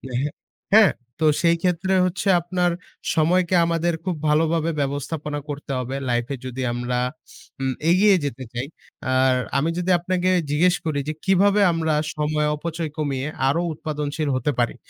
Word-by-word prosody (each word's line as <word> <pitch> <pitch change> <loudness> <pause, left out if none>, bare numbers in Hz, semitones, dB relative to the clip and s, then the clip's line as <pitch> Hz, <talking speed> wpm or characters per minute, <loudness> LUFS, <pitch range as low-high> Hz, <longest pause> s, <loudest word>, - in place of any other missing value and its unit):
এহে 140 +4 0 0.4
হ্যাঁ, 215 -2 +7 0.3
তো 160 - +1 0.2
সেই 170 -1 +4
ক্ষেত্রে 180 +1 0
হচ্ছে 185 +2 -2
আপনার 175 +1 0 0.4
সময়কে 175 +3 +2
আমাদের 170 0 0
খুব 180 -2 -2
ভালোভাবে 160 +1 +2
ব্যবস্থাপনা 145 +2 -3
করতে 145 -1 -6
হবে 130 +2 -4
life 120 +1 0
এ - - -2
যদি 130 +1 -5
আমরা 125 0 -2 0.6
উম 130 -1 0 0.2
এগিয়ে 195 +2 +5
যেতে 130 -2 -4
চাই। 125 +3 -3 0.5
আর 130 0 +4 0.2
আমি 150 +4 +1
যদি 180 +1 0
আপনাকে 185 +1 0 0.2
জিজ্ঞেস 175 +4 +3
করি 150 -3 0
যে, 155 - -1
কিভাবে 200 +2 +4
আমরা 160 -2 0 0.2
সময় 150 0 0
অপচয় 165 0 -4
কমিয়ে 140 -2 -2 0.2
আরও 155 +6 +2
উৎপাদনশীল 150 0 -3
হতে 130 +3 0
পারি? 120 - +1
155 Hz, 155 wpm, -23 LUFS, 140-175 Hz, 0.6 s, হ্যাঁ